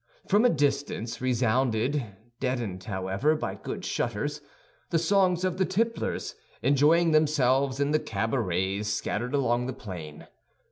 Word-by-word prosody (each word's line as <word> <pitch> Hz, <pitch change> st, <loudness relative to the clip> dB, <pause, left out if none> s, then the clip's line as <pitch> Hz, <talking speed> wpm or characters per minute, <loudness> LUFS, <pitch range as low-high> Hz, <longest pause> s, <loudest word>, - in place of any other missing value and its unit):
From 210 Hz, +3 st, +4 dB
a -, -, +7 dB
distance 140 Hz, -, -1 dB
resounded, 125 Hz, +2 st, +1 dB, 0.4 s
deadened, 115 Hz, -8 st, -2 dB
however, 95 Hz, +9 st, 0 dB
by 155 Hz, -, -3 dB
good -, -, -6 dB
shutters, -, -, -2 dB, 0.5 s
the 170 Hz, -, +2 dB
songs 180 Hz, +1 st, +2 dB
of 185 Hz, 0 st, -1 dB
the -, -, +4 dB
tipplers, 225 Hz, +5 st, -1 dB, 0.3 s
enjoying 150 Hz, +6 st, +4 dB
themselves 140 Hz, -3 st, +2 dB
in 140 Hz, +1 st, +1 dB
the 155 Hz, -, +3 dB
cabarets 100 Hz, -, -1 dB
scattered 110 Hz, +5 st, -2 dB
along 125 Hz, -2 st, +1 dB
the 130 Hz, -, -3 dB
plain. 85 Hz, -, -8 dB
130 Hz, 130 wpm, -27 LUFS, 110-155 Hz, 0.5 s, a